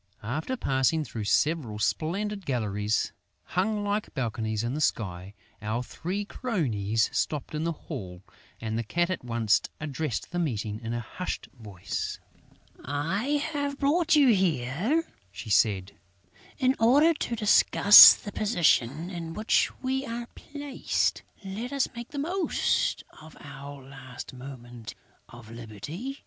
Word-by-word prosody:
After 155 - -3
passing 135 - +1
through 110 -7 -6
several 140 -2 +1
splendid 195 - -1
galleries, 105 -4 -1 0.3
hung 205 +3 -1
like 205 +1 -2
balconies 110 -4 -2
in 120 +2 -2
the 150 - -3
sky, 95 -7 -2 0.3
our 110 +3 -2
three 185 +10 -4
cronies 115 - -1
stopped 150 -1 -2
in 155 +1 -2
the 170 - 0
hall; 100 - -8 0.4
and 110 0 -3
the - - -1
Cat 175 - 0
at 185 - -3
once 115 -3 +2 0.2
addressed 150 -3 -4
the 175 - -2
meeting 110 -9 -2
in 115 0 -4
a - - -2
hushed 180 +10 -5
voice: 105 -6 -5 0.6
"I 195 - -1
have 285 -1 -2
brought 310 +4 +2
you 285 -4 +6
here," 185 - +1 0.3
she 110 +2 -7
said, 100 -2 +2 0.7
"in 260 +1 +2
order 285 +9 +5
to 240 -6 -3
discuss 210 -1 +9
the 205 - -9
position 170 - +1
in 165 -2 -6
which 215 +1 +2
we 265 +1 0
are 235 -2 -5
placed. 285 -2 -2 0.2
Let 215 +7 -5
us 280 -2 +1
make 235 0 -7
the 290 - -8
most 345 +6 0 0.2
of 155 0 -14
our 140 0 -10
last 130 -2 -10
moment 120 -4 -10 0.3
of 120 -2 -13
liberty...." 120 - -7
150 Hz, 135 wpm, -27 LUFS, -, 0.7 s, discuss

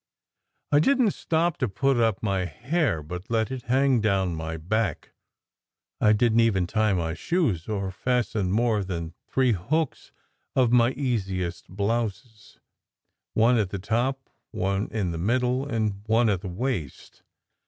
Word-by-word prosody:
I 145 - +6
didn 260 - +3
t 210 - +3
stop 165 0 0
to 130 - 0
put 130 +7 +1
up 115 -4 +1
my 95 -3 0
hair, 125 - -1
but 90 +6 -7
let 115 +1 0
it 130 -1 -4
hang 130 -1 +3
down 95 -4 +1
my 80 0 -4
back; 95 +1 -2 0.9
I 105 - +4
didn 115 +1 +3
t - - +6
even 95 -5 +1
tie 110 +3 +1
my 85 -3 -1
shoes, 105 - -1
or 100 -3 -2
fasten 110 -3 -1
more 110 -1 +2
than 85 -3 -5
three 130 -2 +2
hooks 125 - -2 0.4
of 125 -3 +3
my 120 -1 +5
easiest 95 - -2
blouse: 105 +2 -3 0.8
one 115 +2 +4
at 100 -4 0
the 100 - -4
top, 120 +7 -1 0.2
one 95 +2 -1
in 100 -6 -2
the 85 - -4
middle, 125 +7 +1
and 110 -6 -1
one 115 +1 +3
at 95 -4 0
the 95 - -5
waist. 95 - -4
110 Hz, 155 wpm, -26 LUFS, 95-125 Hz, 0.9 s, I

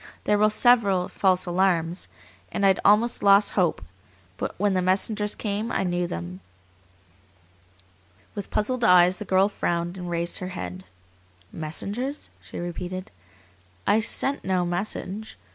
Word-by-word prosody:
"There 210 0 +2
were 215 0 +5
several 210 -6 +3
false 185 -2 +1
alarms, 175 -1 0 0.4
and 200 - 0
I'd 195 -1 +4
almost 220 +4 +3
lost 200 0 +5
hope, 175 - 0 0.5
but - - -4
when 205 +1 +1
the 185 - +1
messengers 205 +3 0
came 210 +2 -3
I - - 0
knew 175 -1 -1
them." 85 - -6 1.9
With 200 -2 -6
puzzled 240 +4 -1
eyes 180 -2 +5
the 210 - -5
girl 190 +1 +3
frowned 175 -3 -2
and 180 -1 -5
raised 170 0 -2
her 185 - -5
head. 90 +1 -6 0.7
"Messengers?" 205 - -4
she - - -10
repeated. 175 +2 -5 0.7
"I 210 - +4
sent 270 +5 -1
no 185 -1 0
message. 195 +3 -4
190 Hz, 135 wpm, -25 LUFS, 175-210 Hz, 1.9 s, were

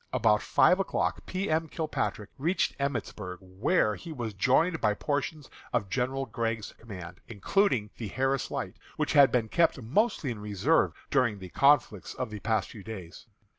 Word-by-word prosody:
About 110 -4 +3
five 185 - +4
o'clock 195 - -1
P. 190 +2 -2
M. 160 +1 +1
Kilpatrick 155 -9 -3
reached 170 +7 +1
Emmitsburg, 110 -9 -3
where 100 - +1
he 160 - -9
was 120 -7 -4
joined 160 - +2
by 105 -1 +2
portions 145 +3 -2 0.2
of 105 -6 -1
General 130 +2 -1
Gregg's 115 -4 -3
command, 95 -6 -10
including 120 - +1
the 115 - -4
Harris 135 +5 0
Light, - - -4 0.2
which - - 0
had 140 -2 +7
been 120 -3 +1
kept 165 +4 +2
mostly 145 - 0
in 110 - -6
reserve 105 - +2 0.2
during 125 -7 +2
the 95 -2 -9
conflicts 130 - +2
of 130 -4 -4
the 105 - -6
past 110 -1 0
few 105 -4 -10
days. 95 -1 -9
120 Hz, 165 wpm, -29 LUFS, 105-145 Hz, 0.2 s, had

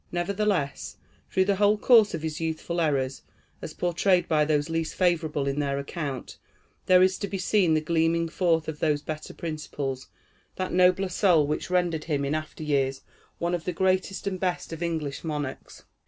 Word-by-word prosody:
Nevertheless, 180 -4 -1 0.3
through 190 - +2
the 200 0 +1
whole 205 +1 +4
course 220 -4 +5
of 160 - -6
his 160 0 -4
youthful 165 +1 -2
errors, 135 -4 0 0.4
as - - -7
portrayed 180 +1 +2
by 155 -1 +3
those 150 -1 +1
least 165 -1 -2
favorable 165 -5 +1
in 140 +1 -1
their 140 -1 -1
account, 140 -1 -5 0.5
there 185 0 +6
is 185 0 +2
to 200 - -2
be 195 0 -4
seen 185 -3 +2
the 155 - +2
gleaming 165 +1 +1
forth 165 -1 +1
of 155 -1 -5
those 150 -2 +1
better 155 0 -6
principles, 145 -5 -5 0.5
that 185 0 -3
nobler 185 +1 +4
soul, 180 -5 +3
which 150 +4 -3
rendered 175 -4 0
him 145 -4 -1
in 140 - -1
after 155 0 -4
years 135 -3 0 0.4
one 170 +1 -1
of 175 -2 -2
the 180 - -2
greatest 190 +2 0
and 190 -2 -2
best 180 -2 -2
of 165 - -7
English 160 -5 -3
monarchs. 150 -4 -5
165 Hz, 180 wpm, -26 LUFS, 150-185 Hz, 0.5 s, there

